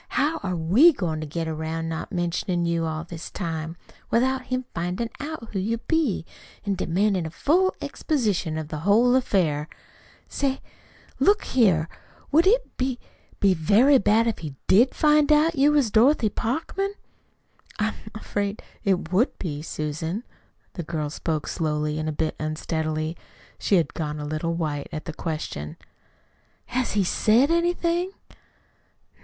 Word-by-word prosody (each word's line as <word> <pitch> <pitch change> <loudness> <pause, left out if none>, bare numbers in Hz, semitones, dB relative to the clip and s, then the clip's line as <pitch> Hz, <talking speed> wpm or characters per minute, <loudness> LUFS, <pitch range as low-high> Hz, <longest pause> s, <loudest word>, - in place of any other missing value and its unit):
How 305 +4 +2
are 185 -2 -2
we 195 - +6
goin' 160 - -2
to 155 - -5
get 165 +2 -3
'round 160 +1 -3
not 160 0 -4
mentionin' 175 -1 -1
you 170 -1 0
all 155 0 -3
this 170 -1 -8
time, 165 -2 -4 0.3
without 260 +2 +1
his 255 0 -1
findin' 180 +7 -2
out 290 -6 -6
who 195 - -2
you 220 +5 -1
be 255 - 0 0.4
an' 200 - +1
demandin' 190 -1 0
a - - -5
full 355 - +2
exposition 205 - -1
of 155 -1 -5
the 155 - -4
whole 215 +8 +4
affair. 165 - +1 0.6
Say, 270 -1 -1 0.6
look 410 +1 +4
a - - -8
here, 185 -10 +3 0.4
would 325 +5 +5
it - - +2
be 255 -1 -1 0.4
be 195 -2 +4
very 215 - +5
bad 220 +2 +3
if 230 -2 -1
he 150 -4 -7
DID 235 +7 +4
find 300 -1 +4
out 305 +2 +5
you 285 0 +4
was 285 -7 +2
Dorothy 230 +1 +4
Parkman?" 325 - -2 0.8
"I'm 215 +1 0 0.2
afraid 205 -1 -3 0.2
it 185 -4 0
would 215 +9 +2
be, 150 -5 -4
Susan." 160 +6 -3 0.5
The 175 - -4
girl 155 -2 -3
spoke 155 -1 -2
slowly, 150 -1 -1
a 155 0 -1
bit 155 +1 -2
unsteadily. 155 +1 -2 0.4
She 200 - +2
had 170 -3 +1
gone 150 -2 -3
a 150 - -4
little 155 +3 -2
white 150 -4 -3
at 155 - -5
the 165 - -5
question. 155 - -5 0.9
"Has 250 +1 -1
he 205 -1 +2
SAID 230 - +3
anything?" 345 +2 +1
190 Hz, 150 wpm, -25 LUFS, 160-255 Hz, 0.9 s, we